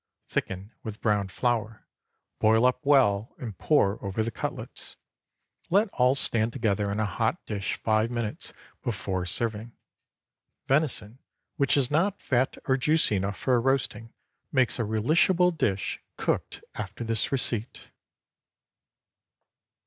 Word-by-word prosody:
Thicken 95 Hz, +4 st, -4 dB
with 110 Hz, -1 st, -7 dB
browned 105 Hz, -3 st, 0 dB
flour, 110 Hz, -1 st, -1 dB, 0.5 s
boil 110 Hz, +2 st, +4 dB
up 125 Hz, +3 st, +1 dB
well 125 Hz, -7 st, +3 dB
and 115 Hz, -6 st, -7 dB
pour 105 Hz, -, +1 dB
over 100 Hz, +2 st, -1 dB
the 115 Hz, -, -3 dB
cutlets. -, -, -6 dB, 0.7 s
Let 200 Hz, +4 st, +3 dB
all 125 Hz, -5 st, +2 dB
stand 115 Hz, -4 st, +2 dB
together 105 Hz, -5 st, 0 dB
in 105 Hz, -, -2 dB
a 110 Hz, -, +1 dB
hot 110 Hz, -, -1 dB
dish 100 Hz, -3 st, -3 dB
five 110 Hz, +1 st, +1 dB
minutes 115 Hz, -3 st, -4 dB, 0.3 s
before 95 Hz, -5 st, -3 dB
serving. 115 Hz, +4 st, +1 dB, 0.9 s
Venison 130 Hz, -5 st, 0 dB, 0.4 s
which 140 Hz, -1 st, +2 dB
is 135 Hz, -2 st, +2 dB
not 190 Hz, +7 st, +1 dB
fat 130 Hz, 0 st, 0 dB
or 130 Hz, -, +2 dB
juicy 150 Hz, -4 st, +2 dB
enough 95 Hz, +2 st, -2 dB
for 125 Hz, -3 st, +2 dB
roasting 115 Hz, -3 st, -1 dB, 0.4 s
makes 130 Hz, -3 st, +2 dB
a 120 Hz, -, 0 dB
relishable 170 Hz, -, +3 dB
dish 100 Hz, -10 st, -1 dB, 0.2 s
cooked -, -, -2 dB
after 100 Hz, +2 st, -6 dB
this 115 Hz, -1 st, 0 dB
receipt. 120 Hz, -4 st, 0 dB
115 Hz, 125 wpm, -27 LUFS, 105-130 Hz, 0.9 s, boil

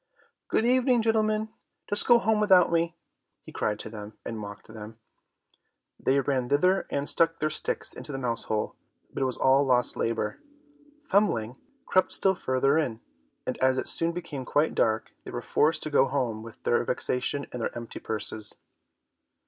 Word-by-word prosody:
"Good 220 Hz, -, +1 dB
evening, 250 Hz, -1 st, +3 dB
gentlemen, 220 Hz, -1 st, +1 dB, 0.4 s
just 205 Hz, 0 st, +3 dB
go 240 Hz, -, +8 dB
home 220 Hz, -2 st, +1 dB
without 190 Hz, -5 st, +5 dB
me," 170 Hz, 0 st, +1 dB, 0.5 s
he -, -, -11 dB
cried 105 Hz, -1 st, -1 dB
to -, -, -6 dB
them, 105 Hz, -1 st, -9 dB
and 115 Hz, -1 st, -5 dB
mocked 100 Hz, -2 st, -8 dB
them. 110 Hz, 0 st, -10 dB, 1.0 s
They 135 Hz, +1 st, +2 dB
ran 130 Hz, -2 st, -1 dB
thither 180 Hz, +7 st, +2 dB
and 140 Hz, 0 st, -2 dB
stuck 165 Hz, 0 st, +2 dB
their 155 Hz, 0 st, -1 dB
sticks -, -, -2 dB
into 150 Hz, -, -8 dB
the 135 Hz, -, -4 dB
mouse 120 Hz, -3 st, -2 dB
hole, 105 Hz, -1 st, -2 dB, 0.4 s
but -, -, -4 dB
it 135 Hz, -, +2 dB
was 130 Hz, -, -3 dB
all 135 Hz, +1 st, +4 dB
lost 125 Hz, -2 st, +2 dB
labour. 115 Hz, -2 st, -2 dB, 0.7 s
Thumbling 125 Hz, -, +2 dB, 0.3 s
crept 185 Hz, -, +2 dB
still 195 Hz, -, +3 dB
farther 135 Hz, -1 st, +1 dB
in, 120 Hz, -8 st, -2 dB, 0.5 s
and -, -, -3 dB
as 130 Hz, 0 st, +3 dB
it -, -, -1 dB
soon 165 Hz, 0 st, +2 dB
became 165 Hz, -6 st, -6 dB
quite 145 Hz, +5 st, +1 dB
dark, 110 Hz, 0 st, +1 dB
they -, -, -9 dB
were -, -, -4 dB
forced 155 Hz, +1 st, +1 dB
to 155 Hz, -, -4 dB
go 135 Hz, -2 st, +5 dB
home 125 Hz, -5 st, -1 dB
with 115 Hz, 0 st, -12 dB
their 120 Hz, -, +2 dB
vexation 125 Hz, +3 st, -1 dB
and 125 Hz, -, -4 dB
their 115 Hz, -, -3 dB
empty 115 Hz, -1 st, -7 dB
purses. 110 Hz, -1 st, -4 dB
135 Hz, 175 wpm, -27 LUFS, 115-170 Hz, 1.0 s, go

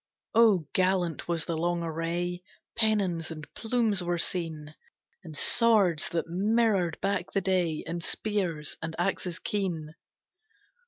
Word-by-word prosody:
Oh 215 Hz, -7 st, +5 dB
gallant 185 Hz, -4 st, +1 dB
was 170 Hz, -2 st, 0 dB
the 165 Hz, -, -2 dB
long 170 Hz, +1 st, 0 dB
array! 170 Hz, +2 st, -2 dB, 0.3 s
Pennons 200 Hz, -8 st, +2 dB
and 155 Hz, -2 st, -7 dB
plumes 225 Hz, -4 st, 0 dB
were 175 Hz, 0 st, -1 dB
seen, 160 Hz, -4 st, -3 dB, 0.5 s
And 160 Hz, -4 st, -8 dB
swords 210 Hz, -9 st, +4 dB
that 170 Hz, -, -1 dB
mirrored 195 Hz, -1 st, +1 dB
back 195 Hz, -2 st, -1 dB
the 195 Hz, -, +2 dB
day, 180 Hz, -4 st, 0 dB
And 170 Hz, 0 st, -4 dB
spears 180 Hz, -10 st, -2 dB
and 160 Hz, 0 st, -4 dB
axes 180 Hz, -1 st, -1 dB
keen. 175 Hz, -8 st, -3 dB
175 Hz, 125 wpm, -28 LUFS, 165-200 Hz, 0.5 s, Oh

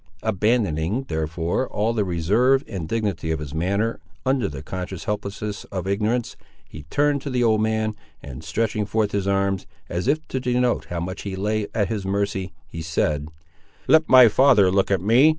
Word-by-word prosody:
Abandoning, 105 Hz, -, +1 dB
therefore, 80 Hz, +8 st, -1 dB
all 110 Hz, +3 st, 0 dB
the 110 Hz, -3 st, +1 dB
reserve 105 Hz, -, +2 dB
and 90 Hz, -7 st, -5 dB
dignity 100 Hz, -8 st, -1 dB
of 80 Hz, -, 0 dB
his 75 Hz, -1 st, -7 dB
manner, 100 Hz, +8 st, 0 dB, 0.3 s
under 130 Hz, -5 st, +2 dB
the 70 Hz, -1 st, -7 dB
conscious 90 Hz, +1 st, -5 dB
helplessness 105 Hz, 0 st, -4 dB
of 95 Hz, -2 st, -5 dB
ignorance, 105 Hz, +5 st, -1 dB, 0.3 s
he 75 Hz, -, -11 dB
turned 145 Hz, -, +2 dB
to 140 Hz, -, -5 dB
the 125 Hz, -2 st, +1 dB
old 110 Hz, -2 st, +3 dB
man, 110 Hz, 0 st, 0 dB, 0.3 s
and 70 Hz, +2 st, -9 dB
stretching 105 Hz, +5 st, -1 dB
forth 105 Hz, 0 st, 0 dB
his 100 Hz, -1 st, -1 dB
arms, 100 Hz, -1 st, 0 dB, 0.2 s
as 90 Hz, +6 st, -2 dB
if 155 Hz, +3 st, +1 dB
to 130 Hz, -, -2 dB
denote 125 Hz, -1 st, +1 dB
how 85 Hz, -, -4 dB
much 95 Hz, +2 st, -5 dB
he 100 Hz, -2 st, -5 dB
lay 105 Hz, +2 st, -1 dB
at 105 Hz, -4 st, +1 dB
his 105 Hz, -3 st, -2 dB
mercy, 95 Hz, -1 st, -1 dB, 0.2 s
he 80 Hz, -, -7 dB
said— 75 Hz, -2 st, -1 dB, 0.6 s
"Let 160 Hz, 0 st, +5 dB
my 130 Hz, -2 st, +9 dB
father 110 Hz, -5 st, +5 dB
look 95 Hz, 0 st, +2 dB
at 95 Hz, -3 st, +1 dB
me. 120 Hz, +9 st, +5 dB
100 Hz, 180 wpm, -23 LUFS, 90-115 Hz, 0.6 s, my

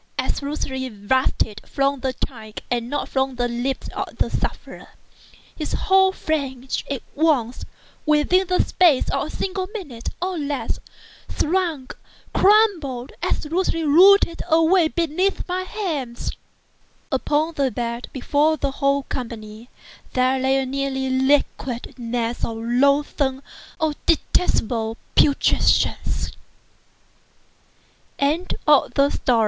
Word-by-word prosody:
absolutely 265 Hz, -2 st, -2 dB
bursting 220 Hz, +1 st, 0 dB
from 275 Hz, 0 st, 0 dB
the 260 Hz, 0 st, -1 dB
tongue 225 Hz, -4 st, -6 dB, 0.2 s
and 240 Hz, -1 st, -1 dB
not 290 Hz, -, -2 dB
from 265 Hz, -1 st, -1 dB
the 245 Hz, 0 st, 0 dB
lips 245 Hz, +3 st, -3 dB
of -, -, -6 dB
the -, -, 0 dB
sufferer, -, -, -4 dB, 0.7 s
his 305 Hz, -, -4 dB
whole 380 Hz, 0 st, +4 dB
frame 275 Hz, -8 st, -3 dB, 0.2 s
at 275 Hz, -3 st, -3 dB
once—within 305 Hz, +4 st, 0 dB
the 365 Hz, 0 st, +2 dB
space 335 Hz, -8 st, +3 dB
of -, -, -1 dB
a -, -, -9 dB
single 375 Hz, -1 st, -3 dB
minute, 275 Hz, -, -6 dB
or 365 Hz, 0 st, -2 dB
even 290 Hz, -3 st, -3 dB
less, 285 Hz, -1 st, -2 dB, 0.6 s
shrunk—crumbled—absolutely 330 Hz, -, 0 dB
rotted 340 Hz, +3 st, +6 dB
away 330 Hz, +2 st, +4 dB
beneath 340 Hz, +4 st, -1 dB
my 365 Hz, 0 st, -1 dB
hands. 320 Hz, -, -4 dB, 0.8 s
Upon 300 Hz, +4 st, 0 dB
the 280 Hz, -3 st, +1 dB
bed, 235 Hz, -1 st, -4 dB
before 295 Hz, +4 st, +1 dB
that 280 Hz, -1 st, -1 dB
whole 275 Hz, 0 st, +1 dB
company, 230 Hz, -2 st, -7 dB, 0.4 s
there 255 Hz, 0 st, +2 dB
lay 265 Hz, +1 st, +2 dB
a 270 Hz, -, 0 dB
nearly 265 Hz, 0 st, -2 dB
liquid 260 Hz, -2 st, 0 dB
mass 235 Hz, 0 st, -2 dB
of 225 Hz, -, -2 dB
loathsome—of 280 Hz, +4 st, 0 dB
detestable 230 Hz, -9 st, +1 dB, 0.2 s
putrescence. 285 Hz, -2 st, +2 dB, 1.9 s
THE 310 Hz, +6 st, 0 dB
BLACK 295 Hz, -4 st, +4 dB
CAT. 280 Hz, +1 st, +2 dB
280 Hz, 110 wpm, -22 LUFS, 255-325 Hz, 1.9 s, rotted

